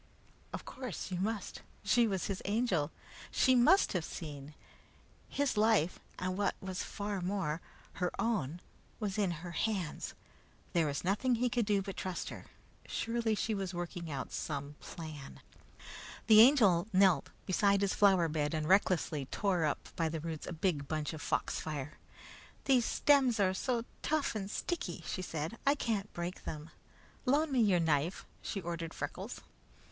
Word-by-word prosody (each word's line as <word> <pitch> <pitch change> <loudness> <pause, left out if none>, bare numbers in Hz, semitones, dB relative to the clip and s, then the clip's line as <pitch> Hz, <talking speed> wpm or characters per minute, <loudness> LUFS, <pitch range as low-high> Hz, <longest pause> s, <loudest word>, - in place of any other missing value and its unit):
Of - - -6
course 250 -7 -6
you 180 - -1
must! 210 0 -3 0.2
She 230 +3 +4
was 190 -4 -1
his 195 -2 -3
Angel. 200 -8 +1 0.4
She 260 - +4
must 255 +11 +5
have 180 -4 0
seen! 150 -3 -7 0.7
His 280 -5 0
life, 210 -6 +3 0.2
and 185 0 -2
what 200 0 +1
was 190 -1 -4
far 205 -2 -3
more, 175 -4 -1 0.4
her 180 - +2
own, 190 - 0 0.4
was 210 -2 -2
in 200 -3 +2 0.2
her 175 - -5
hands. 185 -2 -2 0.6
There 165 -3 +3
was 140 -1 -2
nothing 210 +7 +2
he 245 +2 +1
could 230 -1 +1
do 200 -2 +2
but 195 -1 -6
trust 185 -2 -3
her. - - -9 0.4
Surely 230 -1 0
she 220 +1 -1
was 190 -3 -3
working 175 -1 -4
out 140 -3 -4
some 145 -1 -4
plan. 155 -4 -8 0.9
The 215 -1 +9
Angel 215 -9 +6
knelt 185 -6 +4 0.2
beside 200 +1 +3
his 200 -1 +2
flower 190 -4 +5
bed 150 0 -1
and 155 -1 -1
recklessly 175 -7 +2
tore 180 -1 +1
up 150 - -2
by 165 -1 +1
the 160 0 -3
roots 160 -1 -5
a - - -4
big 160 -4 -1
bunch 155 +1 -2
of 155 - -7
foxfire. 150 -1 -2 0.7
"These 255 -4 +4
stems 270 -6 +4
are 190 -2 +3
so 235 +4 -1 0.2
tough 310 -1 0
and 200 -3 -4
sticky," 200 - -3
she - - -3
said. 165 +4 -4
"I 280 - +6
can't 215 -7 -1
break 175 +1 -5
them. 155 +2 -6 0.6
Loan 295 +3 +3
me 255 -3 +3
your 195 -5 +4
knife," 160 +1 +1 0.2
she 200 - -3
ordered 170 -1 -4
Freckles. - - -5
190 Hz, 160 wpm, -33 LUFS, 160-220 Hz, 0.9 s, The